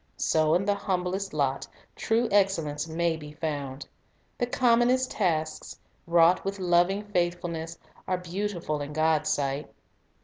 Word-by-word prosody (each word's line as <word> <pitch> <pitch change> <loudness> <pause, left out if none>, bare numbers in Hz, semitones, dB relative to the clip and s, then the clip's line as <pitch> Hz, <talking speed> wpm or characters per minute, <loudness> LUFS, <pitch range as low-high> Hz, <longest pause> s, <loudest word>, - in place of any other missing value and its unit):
So 155 -1 +2
in 185 +3 +1
the 205 - +3
humblest 190 0 -2
lot 140 -3 -1 0.3
true 230 +2 +1
excellence 165 -7 +1
may 165 +1 0
be 150 -1 -10
found; 145 -3 -4 0.5
the 245 - +1
commonest 245 +1 +3
tasks, 160 -6 -1 0.3
wrought 170 +1 +4
with 195 +1 -3
loving 180 +2 +2
faith 175 -4 0
fulness, 165 -1 -5 0.3
are 185 - 0
beautiful 180 -4 -3
in 145 +1 -5
God's 155 0 +2
sight. 140 0 -1
175 Hz, 135 wpm, -27 LUFS, 155-195 Hz, 0.5 s, wrought